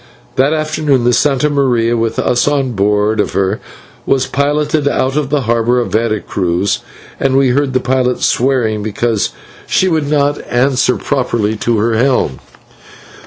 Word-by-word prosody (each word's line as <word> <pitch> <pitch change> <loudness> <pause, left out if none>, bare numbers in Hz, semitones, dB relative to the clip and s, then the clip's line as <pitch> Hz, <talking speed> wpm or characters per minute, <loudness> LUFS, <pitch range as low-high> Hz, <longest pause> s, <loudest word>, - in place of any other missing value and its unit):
That 135 +3 +2
afternoon 155 -4 0
the 120 - +3
/Santa 140 +4 +2
Maria/, 120 -4 +1
with 115 -1 -1
us 120 +2 +1
on 140 -3 0
board 105 +1 +1
of - - 0
her, 100 +2 0 0.4
was 130 -1 +1
piloted 145 +2 0
out 135 -1 0
of 150 -3 -1
the 145 -1 +1
harbour 120 +1 +1
of 120 - -3
Vera 110 -1 0
Cruz, 90 +1 -1 0.4
and 135 -1 +1
we 135 -1 +3
heard 135 +1 0
the 130 - +2
pilot 125 -1 0
swearing 120 -4 +1
because 110 +1 -1 0.4
she 190 - +2
would 160 -5 0
not 145 -1 +1
answer 125 0 +2
properly 120 -6 -1
to 115 +1 0
her 115 +2 +1
helm. 115 - +1
125 Hz, 160 wpm, -14 LUFS, 115-140 Hz, 0.4 s, the